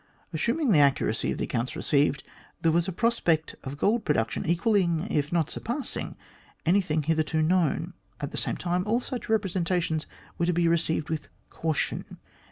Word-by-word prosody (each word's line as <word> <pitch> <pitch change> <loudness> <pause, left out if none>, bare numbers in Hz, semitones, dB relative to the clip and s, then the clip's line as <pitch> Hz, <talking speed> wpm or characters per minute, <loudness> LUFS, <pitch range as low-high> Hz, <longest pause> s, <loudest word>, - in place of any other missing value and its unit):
Assuming 235 - +1
the 160 - +6
accuracy 140 -5 +2
of - - -3
the - - -2
accounts 120 +1 -2
received, 145 0 +1 0.4
there 165 - +4
was 170 +2 +2
a - - -1
prospect 175 -7 +1
of 135 +2 -6
gold 215 +8 +2
production 115 -6 0
equalling, 170 -1 +2
if 150 0 0
not 165 -3 +1
surpassing, 255 +4 -4 0.5
any 185 +5 +4
thing 155 -4 -1
hitherto 155 0 +1
known. 170 -2 +1 0.3
At - - -4
the - - -5
same - - 0
time, 180 0 0
all 230 +3 +2
such 250 -2 -5
represen 195 -5 +1
tations 165 -3 0 0.3
were 170 - +2
to 180 - +2
be 170 0 +2
received 160 -2 +1
with 155 -2 -3 0.2
caution. 160 -2 -2
165 Hz, 175 wpm, -27 LUFS, 155-190 Hz, 0.5 s, the